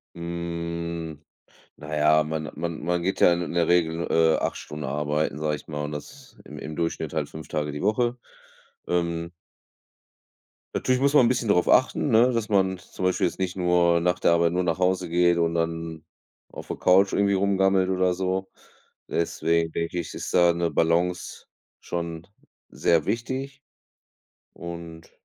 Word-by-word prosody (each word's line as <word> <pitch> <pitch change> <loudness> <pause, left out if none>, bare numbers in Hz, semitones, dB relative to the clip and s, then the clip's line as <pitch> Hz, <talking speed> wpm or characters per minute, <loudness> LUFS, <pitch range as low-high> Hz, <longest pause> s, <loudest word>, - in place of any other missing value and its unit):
Hm, 85 -2 -5 0.6
na 75 +1 -6
ja, 75 +1 +4
man 80 0 -4
man 85 -1 -4
man 85 0 0
geht 95 - -1
ja - - +7
in 85 - -2
in 85 - -5
der 85 -1 +2
Regel, 85 -1 +1
äh, 80 -1 +4
8 - - -2
Stunden 75 0 -7
arbeiten, 75 +2 -1
sage 75 0 -1
ich - - -12
mal 75 -1 -4
und 75 - -4
das 75 -1 -10
im - - -10
im 75 - -7
Durchschnitt 80 -2 -3
halt 75 -2 -2
5 80 0 -9
Tage 75 -1 -2
die 75 - -6
Woche. 120 +4 +1 0.7
Ähm 85 -1 -1 1.4
Natürlich 130 0 +1
muss 140 +1 +2
man 130 -5 +7
'n - - +4
bisschen 120 -3 0
darauf 90 -3 +3
achten, 130 +2 +3
ne, 120 +3 +5
dass 115 -2 -1
man 95 -3 +2
zum 95 - -8
Beispiel 90 -1 +2
jetzt 90 - -5
nicht 95 -1 -2
nur 90 -1 +3
nach 90 +1 0
der - - +4
Arbeit 85 0 +3
nur 90 - +1
nach 85 -2 -1
Hause 95 -1 +1
geht 85 0 +3
und 85 -1 +1
dann 80 -1 -3 0.5
auf - - -9
der - - -4
Couch 95 +2 +4
irgendwie 100 0 +2
rumgammelt 95 -1 +2
oder 90 -1 +2
so. 95 +1 -2 0.6
Deswegen 85 -1 0
denke 85 +1 -3
ich, 85 -3 -5
ist - - -5
da 85 -1 +5
'ne 85 0 -1
Balance 85 +3 0 0.3
schon 85 -1 -5 0.4
sehr 85 -3 +1
wichtig. 135 +4 -3 0.9
Und 85 -1 -9
85 Hz, 170 wpm, -25 LUFS, 80-95 Hz, 1.4 s, ja